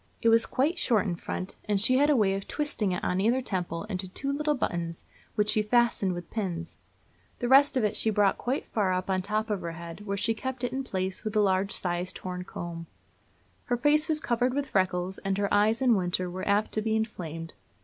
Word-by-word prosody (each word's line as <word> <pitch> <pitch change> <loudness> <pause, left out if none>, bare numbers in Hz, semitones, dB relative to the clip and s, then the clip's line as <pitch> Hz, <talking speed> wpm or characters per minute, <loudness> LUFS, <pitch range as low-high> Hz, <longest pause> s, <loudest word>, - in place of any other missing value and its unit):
It 230 - +3
was 225 0 +5
quite 305 +7 0
short 225 -4 +2
in 180 -4 -1
front, 185 +2 -5
and 205 -2 +1
she 255 +6 +4
had 290 +1 +4
a 295 - +5
way 205 -5 +3
of 195 0 -4
twisting 290 -10 -1
it, 180 - -3
on 180 +1 0
either 235 +5 +3
temple, 180 -8 -3
into 190 -3 -4
two 275 +9 -3
little 300 +1 0
buttons, 170 -8 -3 0.3
which 210 0 +2
she 215 - +3
fastened 210 -3 +2
with 175 -1 -8
pins. 175 -6 -4 0.6
The 245 - -2
rest 275 +2 +6
of 250 - +2
it 210 0 +1
she 225 - +2
brought 205 -2 +2
quite 255 +3 -2
far 200 -4 0
up 185 +1 -1
on 185 0 +1
the 185 - -6
top 215 +1 -1
of 205 - -1
her 170 -1 -4
head, 170 +5 -9
where 200 0 -1
she 225 +3 +1
kept 260 +2 -5
it 245 0 -1
in 270 +1 -2
place 190 -5 -3
with 215 -1 -4
a - - +4
large 195 -1 +2
sized 180 0 -2
horn 180 -1 -5
comb. 170 -2 -6 0.8
Her 245 - 0
face 300 +5 +3
was 310 -1 +2
covered 245 -1 0
with 285 -1 -1
freckles, 185 -1 0
and 195 0 -1
her 200 0 0
eyes, 215 +4 +3
in 250 -2 +5
winter, 180 -2 0
were 185 +1 -5
apt 205 +1 +2
to 215 - +1
be 220 0 0
inflamed. 165 -7 -4
205 Hz, 230 wpm, -28 LUFS, 185-240 Hz, 0.8 s, rest